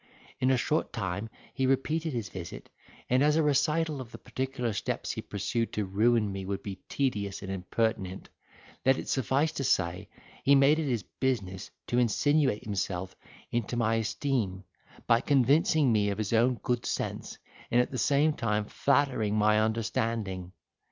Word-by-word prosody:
In 130 - +2
a 130 - +4
short 155 +6 0
time 100 -1 -3 0.2
he 135 -1 0
repeated 155 +5 0
his 115 -5 -3
visit; 90 -3 -8 0.4
and 125 +1 +3
as 150 +1 +4
a 160 - +3
recital 150 +1 +1
of 120 -2 -10
the - - -8
particular 130 -3 -3
steps 100 - -2
he - - -4
pursued 115 +3 -2
to 105 - -1
ruin 105 +2 +2
me 95 0 -5
would 95 +1 -4
be 95 -2 -6
tedious 105 -8 -1
and 95 - -5
impertinent, 95 0 -2 0.6
let 130 0 +4
it - - -6
suffice 135 +4 +1
to 135 - -4
say, 95 -3 0 0.3
he 140 +2 +6
made 140 +3 +5
it 155 -3 -1
his 115 -5 -1
business 100 -8 -3 0.2
to 120 - +1
insinuate 130 +1 +2
himself 95 -3 -3 0.4
into 120 0 -1
my 115 -1 +2
esteem, 110 -4 -1 0.4
by 115 -1 +4
convincing 140 +1 +3
me 105 -2 +2
of 100 - -2
his 110 0 -2
own 120 +3 +4
good 120 -1 0
sense, - - -3 0.3
and 120 - +3
at 125 - +1
the 130 - -3
same 145 +2 +3
time 105 -5 -1
flattering 130 -5 +1
my 105 0 +4
understanding. 110 -4 -1
115 Hz, 165 wpm, -29 LUFS, 100-135 Hz, 0.6 s, he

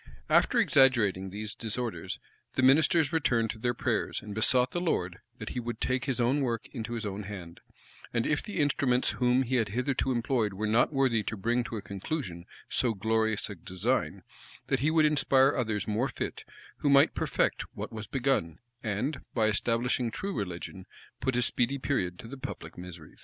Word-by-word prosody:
After - - +4
exaggerating 110 -8 +4
these 105 +1 -5
disorders, 115 +1 -3 0.4
the 130 - +1
ministers 155 +4 +4
returned 120 -8 +2
to 110 - -10
their 120 +1 0
prayers; - - -1
and 105 0 -8
besought 125 +4 +4
the 175 - -2
Lord 90 - -1 0.2
that - - -6
he 125 - -3
would 120 -1 -5
take 130 0 0
his 130 -3 -1
own 125 +5 +2
work 120 -4 -1
into 120 -2 -4
his 115 -2 -3
own 100 0 -4
hand; 95 -4 -8 0.5
and 115 -1 0
if 150 -1 +1
the 210 - -7
instruments 135 -4 +2
whom 125 +1 +2
he 130 +1 0
had 115 -3 +1
hitherto 125 +4 0
employed 120 -3 0
were 105 +3 -3
not 110 +6 +3
worthy 130 -5 +2
to 110 +1 -4
bring 120 +5 +1
to 115 - -5
a 100 - -6
conclusion 100 - -5 0.2
so 120 -3 0
glorious 110 +1 +1
a 105 - -6
design, 90 0 -2 0.5
that - - +2
he 145 +5 +2
would 160 -1 +4
inspire 140 -2 +4
others 110 -5 -1
more 110 +5 +1
fit, - - -5 0.3
who 145 - 0
might 140 0 +6
perfect - - 0
what - - -5
was 110 -1 -6
begun, 125 - 0 0.2
and, 115 +7 -2
by 110 -3 +3
establishing 115 +3 +1
true 195 - -4
religion, 95 -2 -5 0.3
put 130 -2 0
a 125 - +2
speedy 125 +4 0
period 95 -10 -1
to - - -10
the 135 +3 -9
public - - -7
miseries. 90 -3 -10
120 Hz, 185 wpm, -29 LUFS, 105-130 Hz, 0.5 s, might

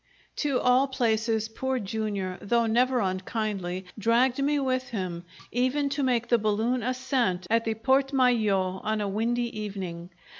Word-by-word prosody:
To 280 -4 +1
all 250 +2 +4
places, 225 -4 0
Poor 260 +4 -2
Jr., 200 -4 -3
though 235 +3 +2
never 245 +2 +2
unkindly, 190 -1 -2
dragged 240 +5 +2
me 290 +1 +2
with 255 -1 -1
him, 180 -6 -4 0.3
even 260 +4 +1
to 280 +1 -2
make 245 -3 +1
the 235 - +4
balloon 220 +4 0
ascent 250 -7 0
at 230 0 +3
the 225 -1 0
Porte 265 +5 +2
Maillot 215 -8 +2
on 215 0 0
a 205 - -1
windy 235 +4 -1
evening. 185 -4 -6
230 Hz, 150 wpm, -27 LUFS, 205-255 Hz, 0.3 s, all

